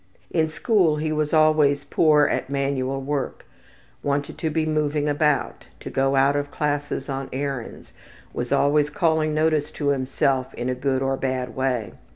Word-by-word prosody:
In 160 -2 +1
school 180 -2 +2
he 155 +1 -2
was 150 -1 -1
always 155 -2 +4
poor 150 -2 +4
at - - -1
manual 135 -1 -1
work, 140 0 -3 0.6
wanted 145 0 -2
to 160 - -1
be 155 +1 0
moving 150 -1 0
about, 145 -4 0
to - - -8
go 135 +1 +1
out 135 +1 +3
of 145 0 -1
classes 145 -2 -2
on 135 -1 -4
errands, 135 -3 -5 0.4
was - - -4
always 145 +1 +3
calling 160 -3 +1
notice 155 -1 +1
to 145 -2 -1
himself 130 -1 0
in 120 +1 -3
a - - +1
good 130 +1 -1
or 135 0 0
bad 130 -2 -3
way. 130 -5 -1
145 Hz, 165 wpm, -23 LUFS, 135-155 Hz, 0.6 s, always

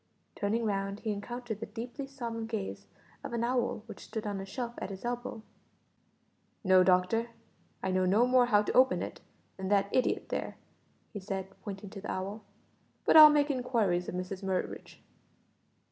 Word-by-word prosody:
Turning 225 +3 0
round 195 -1 -2
he 220 - -1
encountered 225 +2 -5
the 225 - -5
deeply 240 +6 -6
solemn 235 -5 -5
gaze 220 -4 -5 0.4
of - - -6
an 235 0 0
owl 240 -3 0
which - - -10
stood 220 -1 -5
on 200 -2 -3
a - - -6
shelf 235 +3 -4
at - - -4
his 195 +3 -8
elbow. 240 -2 -4 1.2
"No, 185 -2 +6
doctor, 185 +6 +2 0.5
I 190 - 0
know 185 0 +2
no 210 +6 +4
more 250 -1 +4
how 210 -3 +4
to - - -2
open 260 +1 +4
it - - -7 0.4
than 190 -1 -4
that 200 0 +2
idiot 255 - +1
there," - - -3 0.6
he 205 - -4
said, 190 -1 -4
pointing 195 -2 -7
to 195 - -8
the - - -4
owl, 195 +4 -4 0.6
"but - - +4
I'll 310 -1 +12
make 295 0 +3
inquiries 230 -9 0
of - - -5
Mrs 185 +1 -4
Murridge." 190 -2 -4
215 Hz, 175 wpm, -31 LUFS, 195-240 Hz, 1.2 s, I'll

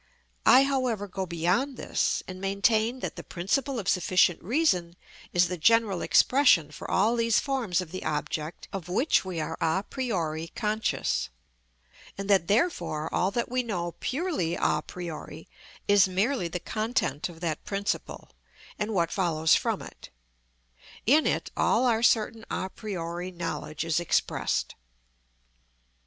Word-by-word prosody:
I 260 - +8
however 255 -7 0
go 190 0 -4
beyond 180 - 0
this, - - -1
and 185 0 -8
maintain 220 +5 +1
that - - -4
the - - -6
principle 245 +10 -1
of 200 -5 -4
sufficient 180 -2 +3
reason 185 - +1 0.4
is 175 0 +3
the 180 -1 -5
general 220 -1 +3
expression 250 - +4
for - - -8
all 215 +5 +3
these 230 -1 +3
forms 240 - -1
of 170 -3 -8
the 185 - -5
object 155 +1 -3
of 185 -4 -5
which 250 - +2
we 185 -3 -4
are 160 +1 -4
a 165 +4 +1
priori 165 - -2
conscious; 215 - -1 0.9
and 195 0 -5
that 190 -4 +4
therefore 175 - 0
all 185 - +2
that 235 +3 -2
we 255 0 +1
know 175 -8 -3
purely 275 - -1
a - - +1
priori, 170 -3 -8 0.4
is 200 -1 +6
merely 195 +3 0
the 180 +2 -4
content 215 - -2
of 165 -2 -12
that 160 -3 -2
principle 200 0 -3 0.5
and 210 0 -2
what 170 -2 +1
follows 160 -4 +2
from - - +1
it; - - -12 1.0
in 300 +7 +4
it - - -1
all 240 +3 +2
our 230 -2 +2
certain 225 -1 +2
a 185 - -3
priori 175 -4 -5
knowledge 165 -3 -4
is 165 -1 +1
expressed. 175 - 0
190 Hz, 145 wpm, -27 LUFS, 170-230 Hz, 1.0 s, I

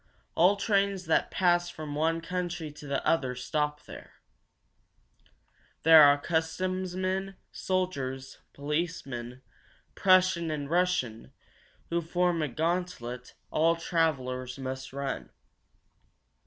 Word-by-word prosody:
All 180 +5 +5
trains 200 -2 0
that 160 - +2
pass 175 -2 +2
from 155 -4 -7
one 165 +2 0
country 175 -2 -4
to 150 0 -12
the 140 -1 -2
other 130 -6 +1
stop 150 +3 -2
there. - - -11 1.7
There 160 0 +9
are 145 -1 +7
customs 180 +4 -2
men, 190 +1 -2 0.2
soldiers, 135 -9 -3
policemen, 140 -5 -4 0.5
Prussian 185 -3 +3
and 150 -2 -3
Russian, 170 -11 0 0.6
who 170 0 +1
form 175 0 0
a 155 - 0
gauntlet 155 -5 -3 0.2
all 165 +2 +3
travelers 130 -7 -1
must 130 0 -5
run. 135 - -4
160 Hz, 105 wpm, -29 LUFS, 135-180 Hz, 1.7 s, There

